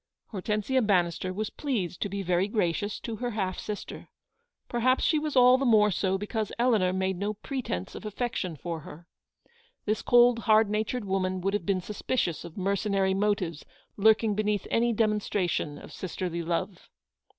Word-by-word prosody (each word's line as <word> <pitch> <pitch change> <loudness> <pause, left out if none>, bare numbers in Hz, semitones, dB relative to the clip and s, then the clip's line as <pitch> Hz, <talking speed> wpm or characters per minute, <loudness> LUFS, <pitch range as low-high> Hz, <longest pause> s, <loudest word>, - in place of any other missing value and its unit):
Hortensia 210 +5 0
Bannister 185 -4 +1
was 210 +3 -3
pleased 215 - -3
to 205 - -1
be 200 +1 -3
very 180 +1 +1
gracious 205 -1 -1
to 230 -2 -5
her 245 +1 -2
half 190 -5 -2
sister. 210 -1 -6 0.6
Perhaps 255 +2 +2
she 310 - +3
was 300 -1 -3
all 250 0 +7
the - - 0
more 215 -3 +5
so 190 +1 0
because 210 +1 -3
Eleanor 225 -7 +3
made 190 0 -1
no 210 +2 -2
pretence 215 - -4
of - - -8
affection 210 -5 -3
for 165 +2 -5
her. 155 +2 -12 0.8
This 215 0 0
cold, 240 -1 +5
hard 215 -2 +4
natured 215 +2 -1
woman 185 -1 -1
would 195 +2 0
have 205 -5 -2
been 190 -2 +1
suspicious 205 -2 -2
of 170 +1 -10
mercenary 195 0 +1
motives 190 -5 -1 0.3
lurking 220 +1 +4
beneath 210 -1 0
any 235 +1 +2
demonstration 205 -8 0
of - - -12
sisterly 175 -2 -4
love. 170 +2 -3
205 Hz, 160 wpm, -28 LUFS, 185-220 Hz, 0.8 s, all